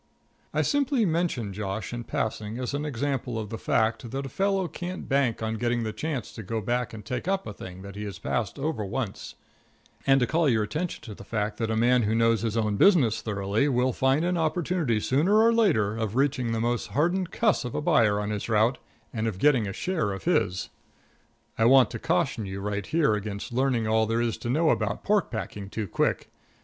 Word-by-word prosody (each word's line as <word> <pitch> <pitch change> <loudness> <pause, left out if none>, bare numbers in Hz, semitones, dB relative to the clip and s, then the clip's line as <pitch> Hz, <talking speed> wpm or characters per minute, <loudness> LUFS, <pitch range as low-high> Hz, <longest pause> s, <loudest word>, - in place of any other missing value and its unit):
I - - +1
simply 280 -5 +2
mention 160 - -1
Josh 100 +2 -4
in 120 -1 -5
passing 110 0 -3
as 125 +1 -3
an 145 +1 -2
example 135 -3 -2
of 110 -2 -5
the 115 - -4
fact 110 +1 0
that 135 +3 -4
a - - -5
fellow 195 +4 0
can't 180 +2 -6
bank 135 -5 +1
on 110 0 -2
getting 120 -1 0
a 110 - -3
chance 140 -4 -4
to - - -7
go 110 +2 -3
back 120 +3 -1
and 105 -2 -9
take 125 +7 -4
up 195 0 0
a 105 - -6
thing 95 -1 -9
that 100 0 -9
he 105 - -6
has 100 -2 -6
passed 110 0 -2
over 140 -5 -2
once, 100 +1 -4 0.7
and 135 0 +6
to 125 - +3
call 160 +2 +2
your 110 -3 +2
attention 160 +10 -4
to 110 - -8
the - - -11
fact 105 -1 -2
that 115 -1 -1
a 110 - 0
man 120 +2 +4
who 110 0 +1
knows 115 -1 +3
his 115 -1 -1
own 105 -2 0
business 135 - +4
thoroughly 105 +5 0
will 125 -1 +1
find 135 +6 +2
an 180 0 +1
opportunity 160 - 0
sooner 155 - +2
or 230 +1 +5
later 135 - +2
of 110 -1 -3
reaching 130 -3 +1
the 115 - -1
most 120 +1 -1
hardened 175 +4 +1
cuss 215 +1 +1
of 125 - -5
a - - 0
buyer 115 -11 +3
on 105 0 -2
his 105 +2 -4
route 110 +3 +3 0.3
and 115 -1 -1
of 105 -5 -3
getting 125 -2 +3
a 95 - -4
share 160 - -1
of 95 - -7
his. 90 +1 0 0.9
I 115 - +4
want 125 -2 +6
to 115 - -5
caution 110 +3 0
you 95 +1 -5
right 100 0 -3
here 155 -8 +2
against 105 +1 -4
learning 125 -3 +1
all 110 0 +2
there 115 +1 0
is 120 -1 0
to 120 - -5
know 155 +5 +3
about 110 -3 -1
pork 210 -1 +2
packing 105 -3 -5
too 105 0 -4
quick. - - -1
120 Hz, 220 wpm, -27 LUFS, 105-145 Hz, 0.9 s, and